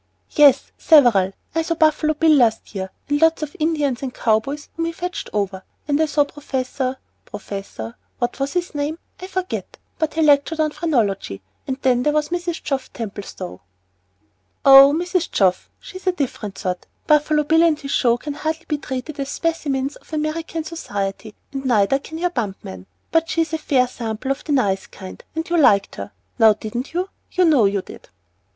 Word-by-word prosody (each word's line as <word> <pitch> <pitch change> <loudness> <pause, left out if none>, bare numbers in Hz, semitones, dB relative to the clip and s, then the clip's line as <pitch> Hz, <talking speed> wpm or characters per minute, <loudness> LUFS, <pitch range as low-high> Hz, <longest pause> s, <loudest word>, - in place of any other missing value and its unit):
"Yes, 285 -3 +5
several. 235 - +5 0.2
I 325 - +1
saw 335 +1 -1
Buffalo 310 -1 +2
Bill 320 +1 +4
last 235 -8 +3
year, 190 -2 -4 0.2
and 290 +1 0
lots 325 -1 +4
of 295 +2 -6
Indians 300 -5 0
and 265 -2 -3
cow 220 -3 +2
boys 285 +6 -7
whom 330 - -1
he 335 - -1
had - - -19
fetched 360 0 -4
over. 195 -2 -2 0.2
And 290 +1 +2
I 315 - +3
saw 295 -1 +3
Professor 265 -2 -3 0.3
Professor 195 - -7 0.2
what 240 +2 -2
was 275 +1 -2
his 355 0 -2
name? 295 +2 -2 0.2
I 370 - -7
forget, 375 -1 -4 0.2
but 315 -1 -1
he 320 - +2
lectured 295 +2 +3
on 310 -1 +2
phrenology; 220 - -1 0.2
and 265 - -2
then 250 -2 +3
there 295 +3 +1
was 300 0 0
Mrs. 345 -1 -3
Geoff 270 -2 -3
Templestowe." 195 - -7 1.0
"Oh 275 +1 +10
Mrs. 350 +2 -1
Geoff 185 -3 +1
she's 375 -1 -11
a - - +5
different 240 - -4
sort. 180 -1 -4 0.2
Buffalo 300 0 +3
Bill 320 +2 +3
and 325 -3 +3
his 275 -1 -6
show 240 -2 +3
can 290 +3 -5
hardly 315 +2 -3
be 300 -2 -1
treated 270 +3 -6
as 275 0 -3
specimens 285 -4 -2
of - - -23
American 315 +1 -2
society, 205 - -5 0.2
and 270 0 -4
neither 240 +1 +3
can 320 +3 -9
your 355 +1 0
bump 215 - -2
man. 95 0 -9 0.2
But 330 0 +2
she's 330 -2 0
a 320 - 0
fair 260 -4 +2
sample 230 +1 -4
of 275 - -3
the 305 - -3
nice 200 -9 +1
kind; 190 -1 -11
and 320 +1 -3
you 345 - +1
liked 200 -9 +4
her, 100 +1 -6 0.3
now 220 -1 +7
didn't 220 +5 -5
you? 365 +2 -1 0.2
you 365 -1 +3
know 290 -9 +5
you 195 -1 +1
did." - - -13
285 Hz, 190 wpm, -21 LUFS, 225-320 Hz, 1.0 s, Oh